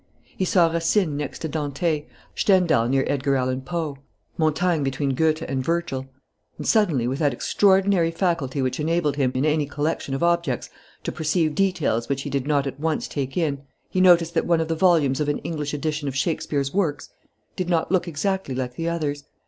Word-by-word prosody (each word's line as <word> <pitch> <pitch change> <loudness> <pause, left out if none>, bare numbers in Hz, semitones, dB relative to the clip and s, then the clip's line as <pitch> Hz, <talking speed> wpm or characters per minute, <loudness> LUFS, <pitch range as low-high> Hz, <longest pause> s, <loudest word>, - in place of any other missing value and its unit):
He 190 - -1
saw 175 -2 +4
Racine 165 0 +1
next 145 +1 -5
to - - 0
Dante, 150 +1 -1 0.3
Stendhal 175 - +3
near 135 0 +2
Edgar 140 0 0
Allan 130 0 0
Poe, 155 -1 -4 0.4
Montaigne 160 +1 +1
between 135 0 -1
Goethe 160 +3 +1
and 130 -1 -2
Virgil. 165 -4 -2 0.5
And - - -6
suddenly, 175 - +2
with 135 +3 -2
that 145 -4 +2
extraordinary 190 +3 +3
faculty 165 -6 -1
which 130 +3 -2
enabled 155 -2 0
him, 130 -3 +2
in 130 +3 +1
any 150 -1 +1
collection 145 -1 -2
of 135 - -2
objects, 170 -6 0 0.3
to - - -2
perceive 155 0 0
details 160 - 0
which 140 0 -1
he 145 - -5
did 140 0 -1
not 145 -2 +2
at 135 0 -5
once 160 0 -1
take 135 0 -4
in, 145 -5 0 0.3
he 185 - +1
noticed 170 -2 +5
that - - 0
one 170 -1 +3
of 160 0 -2
the 165 - +1
volumes 160 -6 +3
of 150 -1 0
an 145 - 0
English 150 -3 -3
edition 150 0 -2
of 135 - -3
Shakespeare's 140 -1 -1
works 160 -6 -1 0.5
did 180 -2 -3
not 170 -1 +1
look 185 -1 +2
exactly 170 -2 -2
like 125 -1 -3
the 165 0 -1
others. 145 -4 -3
155 Hz, 190 wpm, -23 LUFS, 140-170 Hz, 0.5 s, noticed